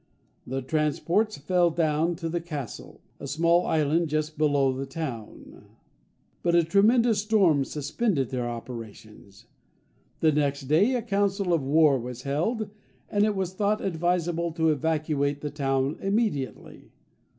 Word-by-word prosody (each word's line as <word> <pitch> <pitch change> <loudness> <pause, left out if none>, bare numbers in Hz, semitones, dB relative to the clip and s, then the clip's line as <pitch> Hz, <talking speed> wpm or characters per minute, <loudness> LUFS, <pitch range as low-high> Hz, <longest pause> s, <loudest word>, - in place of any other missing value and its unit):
The 135 +1 -3
transports 160 - 0
fell 175 +4 +2
down 160 +1 0
to 165 0 -5
the 170 +1 -2
Castle, 150 -8 -7 0.2
a - - -7
small 170 +5 +2
island 160 +2 +1
just 155 0 -2
below 145 -3 +2
the 135 +1 -5
town; 135 -7 -7 0.8
but 170 -1 +2
a 170 - +5
tremendous 215 +5 +3
storm 195 -10 +3
suspended 150 - -1
their 125 -2 -2
operations. 110 -4 -10 0.7
The 160 - +4
next 145 -1 0
day 170 - +3
a 240 - -1
council 200 -3 0
of 165 - +2
war 145 0 +4
was 125 +1 -7
held, 200 - -1 0.4
and 205 0 +3
it 215 -1 0
was 190 -2 -2
thought 210 +2 0
advisable 170 -1 -1
to 160 -1 +1
evacuate 150 -1 0
the 150 - -4
town 135 0 -1
immediately. 195 - -2
160 Hz, 140 wpm, -26 LUFS, 140-180 Hz, 0.8 s, a